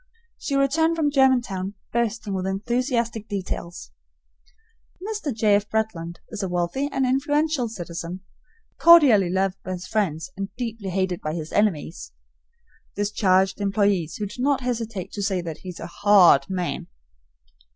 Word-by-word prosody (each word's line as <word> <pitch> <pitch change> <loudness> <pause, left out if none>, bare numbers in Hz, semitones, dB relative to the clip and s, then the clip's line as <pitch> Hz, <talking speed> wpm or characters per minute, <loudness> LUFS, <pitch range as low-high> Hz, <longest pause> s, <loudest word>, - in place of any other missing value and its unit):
She 280 - -2
returned 315 +4 +2
from 305 -3 +1
Germantown 240 -8 +2 0.2
bursting 225 -3 -1
with 190 0 -2
enthusiastic 235 +2 -1
details. 175 - -5 1.1
Mr. 410 -5 -4
J. 215 -3 +2
F. 205 +1 +1
Bretland 195 -7 -2
is 215 -2 -5
a 190 - -2
wealthy 175 +11 -1
and 265 - 0
influential 290 0 +1
citizen, 175 -2 -6 0.6
cordially 275 - +7
loved 190 +1 -1
by 185 - -4
his 180 0 -6
friends 185 - -2
and 195 0 -4
deeply 230 -5 -4
hated 185 -1 -1
by 155 +1 -3
his 160 -2 -6
enemies 190 -6 -1 0.8
(discharged 195 -2 +1
employees, 200 -4 +1
who 210 - -3
do 210 +5 -7
not 275 0 +2
hesitate 230 -6 -3
to 205 - -5
say 195 -2 0
that 165 -3 -6
he 185 - -9
is 175 - -8
a - - -6
HAR 200 -4 +6
RD 140 - -21
man). 180 -2 -3
205 Hz, 150 wpm, -24 LUFS, 185-245 Hz, 1.1 s, cordially